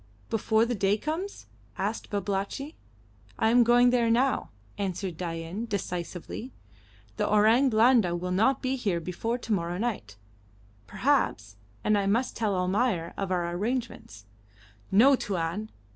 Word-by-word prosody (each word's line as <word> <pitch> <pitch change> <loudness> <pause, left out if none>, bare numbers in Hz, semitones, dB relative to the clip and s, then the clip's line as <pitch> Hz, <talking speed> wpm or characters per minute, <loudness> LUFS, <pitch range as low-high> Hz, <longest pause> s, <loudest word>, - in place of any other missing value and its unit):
"Before 220 +1 +2
the 245 - -2
day 200 -1 +1
comes?" 325 - -4 0.3
asked 205 +4 -3
Babalatchi. 200 - -3 0.6
"I 220 - +2
am 240 +1 +6
going 245 +1 +5
there 240 -2 +2
now," 255 +4 +1 0.3
answered 190 -2 -3
Dain, 170 +5 -5
decisively. 180 +3 -5 0.7
"The - - 0
Orang 220 +6 +4
Blanda 225 -5 +4
will 180 +1 -3
not 225 +10 +2
be 265 +1 0
here 200 -8 -1
before 180 +8 -3
to 235 -2 -3
morrow 175 -2 -1
night, 190 - -3 0.7
perhaps, 105 +4 0 0.3
and 210 -1 +3
I 195 - -1
must 235 +6 0
tell 215 -4 0
Almayer 185 -1 0
of 195 -1 -3
our 175 -1 0
arrangements." 210 - -4 0.6
"No, 250 +8 +6
Tuan. 195 0 -3
205 Hz, 135 wpm, -27 LUFS, 180-240 Hz, 0.7 s, am